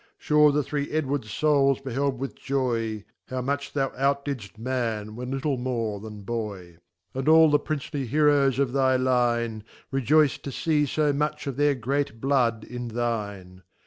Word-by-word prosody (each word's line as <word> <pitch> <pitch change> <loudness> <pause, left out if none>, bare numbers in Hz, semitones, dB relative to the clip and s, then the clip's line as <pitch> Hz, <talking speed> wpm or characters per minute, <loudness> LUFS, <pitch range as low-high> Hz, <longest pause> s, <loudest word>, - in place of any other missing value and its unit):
Sure 150 0 +4
the 145 +1 +1
three 145 +1 -3
Edwards 145 -6 -1
Souls 140 +2 +2
beheld 135 0 -1
with 135 +2 -4
Joy,. 130 -3 -1
^ 110 -2 -4 0.2
How 130 - -3
much 140 +2 -2
thou 135 -2 0
outdidfl: 140 -5 -2
Man, 115 -3 -2
when 125 +1 -6
little 135 +1 -1
more 115 -5 -2
than 105 -1 -9 0.9
And 135 +1 -3
all 160 -1 +7
the 145 - +4
"Princely 145 -2 -4
Heroes 145 -1 +3
of 135 -3 +1
thy 130 -1 +3
Line, 120 -3 +1 0.3
Rejoyc 140 +2 +3
d - - -6
to - - -6
fee 150 0 +1
fo 150 +1 +1
much 150 +1 -2
of 140 -3 -3
their 145 +1 +3
great 130 -1 -2
iBlood 120 -4 +1
in 125 0 -6
thine. 105 -6 -4
135 Hz, 165 wpm, -26 LUFS, 115-145 Hz, 0.9 s, all